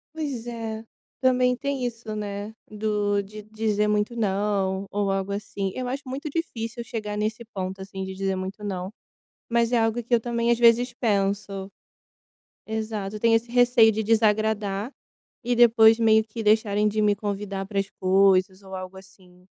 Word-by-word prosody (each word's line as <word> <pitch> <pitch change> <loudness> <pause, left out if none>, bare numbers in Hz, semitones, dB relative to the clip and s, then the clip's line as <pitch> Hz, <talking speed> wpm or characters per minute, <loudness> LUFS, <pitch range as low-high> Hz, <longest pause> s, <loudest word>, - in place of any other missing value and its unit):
Pois 270 -7 -4
é. 225 -2 -5 0.4
Também 250 -1 +3
tem 275 -1 -2
isso, 230 -2 -5
né. 205 +1 -5 0.2
Do 210 -1 0
de 210 +2 -10
dizer 215 -1 -1
muito 210 +3 0
não 200 -2 0
ou 200 -1 0
algo 195 0 -2
assim. 200 -1 -3
Eu 255 -1 -3
acho 270 +3 -3
muito 275 +4 -5
difícil 235 -7 -4
chegar 210 -2 -5
nesse 220 +3 -2
ponto, 190 0 -4
assim, 190 0 -6
de 190 - -6
dizer 195 0 -1
muito 190 +3 -6
não. 190 -1 -4 0.6
Mas 235 0 +2
é 240 - +3
algo 225 +1 0
que 240 - -4
eu 235 - +6
também 235 0 0
às 235 - +3
vezes 240 +1 +4
penso. 200 -3 -1 1.0
Exato, 215 -2 -3
eu - - -5
tenho 230 0 +4
esse 230 +1 -1
receio 245 -2 +5
de 220 +1 -2
desagradar 215 0 +1 0.5
e 245 0 0
depois 225 -1 +6
meio 220 -1 +5
que 220 +1 -7
deixarem 210 -1 +3
de 215 +1 0
me 205 -1 +3
convidar 200 -1 -4
para 200 -1 -1
as 195 - -2
coisas, 190 0 +3
ou 190 0 -8
algo 185 0 -7
assim. 180 -2 -18
215 Hz, 170 wpm, -25 LUFS, 200-230 Hz, 1.0 s, eu